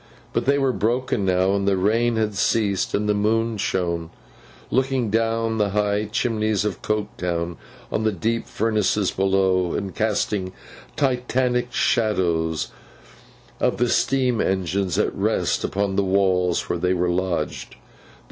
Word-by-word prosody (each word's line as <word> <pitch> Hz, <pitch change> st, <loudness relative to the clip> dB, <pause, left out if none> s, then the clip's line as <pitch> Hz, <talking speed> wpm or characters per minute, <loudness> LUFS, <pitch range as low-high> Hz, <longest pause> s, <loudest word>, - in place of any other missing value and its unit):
But, -, -, 0 dB
they 140 Hz, +2 st, +3 dB
were 135 Hz, -2 st, +1 dB
broken 120 Hz, -2 st, 0 dB
now, 95 Hz, +1 st, +2 dB
and 100 Hz, 0 st, 0 dB
the 100 Hz, -1 st, +3 dB
rain 115 Hz, +5 st, +2 dB
had 110 Hz, -1 st, 0 dB
ceased, 100 Hz, 0 st, +1 dB
and 105 Hz, +1 st, 0 dB
the 105 Hz, -, +3 dB
moon 110 Hz, +2 st, +1 dB
shone,—looking 95 Hz, -, -3 dB
down 115 Hz, 0 st, 0 dB
the 105 Hz, -1 st, +2 dB
high 105 Hz, +1 st, 0 dB
chimneys 110 Hz, -1 st, 0 dB
of 105 Hz, -, -3 dB
Coketown 90 Hz, -5 st, -2 dB, 0.4 s
on 110 Hz, -, -1 dB
the 110 Hz, -, +2 dB
deep 115 Hz, +5 st, -2 dB
furnaces 105 Hz, -2 st, +1 dB
below, 95 Hz, -2 st, +1 dB
and 100 Hz, -3 st, -3 dB
casting 105 Hz, -3 st, -1 dB, 0.4 s
Titanic 125 Hz, -2 st, 0 dB
shadows 85 Hz, -8 st, +1 dB, 0.9 s
of -, -, +1 dB
the 120 Hz, +1 st, +1 dB
steam 130 Hz, -3 st, +2 dB
engines 95 Hz, -1 st, 0 dB
at -, -, +1 dB
rest, -, -, 0 dB
upon 100 Hz, -1 st, -1 dB
the 100 Hz, -, +3 dB
walls 95 Hz, -2 st, +1 dB
where 85 Hz, -, -2 dB
they 90 Hz, +1 st, +1 dB
were 90 Hz, 0 st, +1 dB
lodged. 85 Hz, -3 st, -2 dB
105 Hz, 140 wpm, -23 LUFS, 95-115 Hz, 0.9 s, they